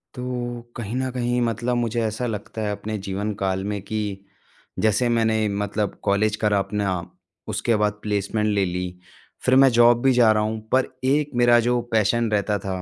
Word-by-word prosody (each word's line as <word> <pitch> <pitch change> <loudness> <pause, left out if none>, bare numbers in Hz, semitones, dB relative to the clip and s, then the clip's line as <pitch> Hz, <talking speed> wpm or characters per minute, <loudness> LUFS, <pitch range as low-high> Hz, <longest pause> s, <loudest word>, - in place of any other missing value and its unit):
तो 125 -1 -4
कहीं 115 0 -5
न 130 0 -1
कहीं, 120 -1 -1
मतलब 120 +1 -1
मुझे 120 -1 0
ऐसा 110 +2 -2
लगता 110 0 -5
है 105 - -1
अपने 105 +1 -4
जीवनकाल 95 -1 -2
में 100 - -3
कि 110 +3 -4 0.8
जैसे 110 +3 +2
मैंने 110 -2 +2
मतलब 100 0 -2
कॉलेज 105 +1 +2
करा 105 -1 +3
अपना, 100 -3 -1 0.5
उसके 115 - 0
बाद 105 0 +1
प्लेसमेंट 105 +1 -1
ले 100 -2 +2
ली, 90 0 -4 0.5
फिर 130 - +4
मैं 135 0 +7
जॉब 120 0 +6
भी 135 - +5
जा 120 -3 +5
रहा 105 0 +2
हूँ। 110 +1 -2
पर 130 0 +3 0.2
एक 145 +2 +1
मेरा 120 0 +6
जो 120 +1 +1
पैशन 115 +1 +2
रहता 105 0 +1
था, 95 -1 -4
110 Hz, 180 wpm, -23 LUFS, 105-120 Hz, 0.8 s, मैं